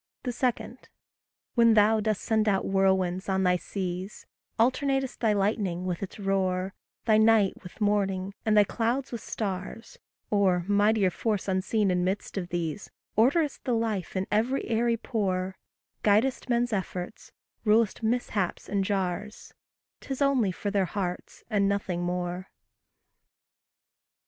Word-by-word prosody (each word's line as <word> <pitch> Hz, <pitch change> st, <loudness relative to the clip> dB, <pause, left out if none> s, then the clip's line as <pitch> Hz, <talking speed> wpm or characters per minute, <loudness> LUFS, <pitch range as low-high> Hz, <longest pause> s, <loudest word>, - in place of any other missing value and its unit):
2. 250 Hz, -, -1 dB, 1.2 s
When 230 Hz, -2 st, +5 dB
thou 215 Hz, +1 st, +5 dB
dost 215 Hz, -1 st, -1 dB
send 220 Hz, -1 st, +2 dB
out 195 Hz, -1 st, +1 dB
whirlwinds 190 Hz, -1 st, +1 dB
on 190 Hz, 0 st, +1 dB
thy 180 Hz, -1 st, +4 dB
seas, 185 Hz, +1 st, -5 dB, 0.3 s
Alternatest 270 Hz, +2 st, +1 dB
thy 225 Hz, -2 st, +2 dB
lightning 195 Hz, -3 st, 0 dB
with 180 Hz, -2 st, -2 dB
its 195 Hz, -, -6 dB
roar, 190 Hz, -1 st, 0 dB, 0.3 s
Thy 220 Hz, -1 st, +5 dB
night 220 Hz, -3 st, +4 dB
with 180 Hz, -, -12 dB
morning, 200 Hz, -2 st, 0 dB
and 215 Hz, -1 st, +2 dB
thy 210 Hz, -, +8 dB
clouds 240 Hz, +6 st, -1 dB
with 235 Hz, -3 st, -5 dB
stars 200 Hz, +2 st, -5 dB, 0.3 s
Or, 185 Hz, -4 st, +2 dB
mightier 205 Hz, -1 st, +3 dB
force 210 Hz, +2 st, -2 dB
unseen 195 Hz, +2 st, +1 dB
in 180 Hz, 0 st, +1 dB
midst 190 Hz, +3 st, -2 dB
of 180 Hz, -3 st, -3 dB
these, 170 Hz, +2 st, -3 dB, 0.3 s
Orderest 280 Hz, +7 st, +2 dB
the 250 Hz, -3 st, 0 dB
life 220 Hz, -6 st, -2 dB
in 185 Hz, 0 st, 0 dB
every 230 Hz, +6 st, +1 dB
airy 230 Hz, +1 st, +1 dB
pore; 190 Hz, -5 st, -2 dB, 0.5 s
Guidest 225 Hz, +6 st, +2 dB
men's 240 Hz, -1 st, +1 dB
efforts, 185 Hz, -1 st, -4 dB, 0.3 s
rul'st 220 Hz, 0 st, +3 dB
mishaps 220 Hz, -5 st, -1 dB
and 200 Hz, -1 st, 0 dB
jars, 195 Hz, +1 st, -3 dB, 0.5 s
'Tis 270 Hz, -1 st, -5 dB
only 270 Hz, -8 st, +3 dB
for 200 Hz, +3 st, -4 dB
their 200 Hz, -2 st, +2 dB
hearts, 180 Hz, -1 st, -5 dB
and 200 Hz, -3 st, +2 dB
nothing 195 Hz, -3 st, -1 dB
more. 180 Hz, +1 st, -3 dB
205 Hz, 135 wpm, -27 LUFS, 185-225 Hz, 1.2 s, thy